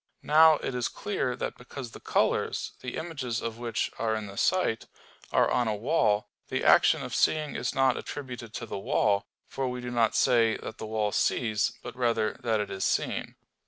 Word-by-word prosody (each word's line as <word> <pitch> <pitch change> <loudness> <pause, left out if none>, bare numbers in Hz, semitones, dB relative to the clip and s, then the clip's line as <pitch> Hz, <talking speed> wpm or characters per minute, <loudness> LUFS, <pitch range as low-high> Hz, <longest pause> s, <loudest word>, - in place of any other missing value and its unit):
Now 155 +1 +7
it - - -2
is 125 -1 0
clear 140 -11 -2
that - - -5
because 125 0 -8
the - - -10
colors, - - 0
the 125 - -5
images 140 -9 -3
of 115 0 -5
which 115 -2 -2
are 110 -1 +1
in 110 -1 -4
the 100 -1 -9
sight, 175 - +1 0.4
are - - +3
on 120 - +2
a 110 - 0
wall, 110 -3 +1 0.2
the - - -2
action - - +5
of - - -6
seeing 155 -2 +1
is - - -2
not 135 -1 +3
attributed 125 -5 -7
to 115 - -4
the 105 - -5
wall: 100 0 +1 0.2
for 135 -1 -3
we 125 0 -3
do 125 0 -5
not 115 -2 +2
say 115 -2 +3
that 110 - -8
the 110 - -5
wall 110 -1 0
sees, 110 -1 +1
but - - -7
rather 115 -3 +1
that 115 -3 +1
it 105 -1 -3
is 95 -1 -3
seen. - - -1
120 Hz, 195 wpm, -28 LUFS, 110-130 Hz, 0.4 s, Now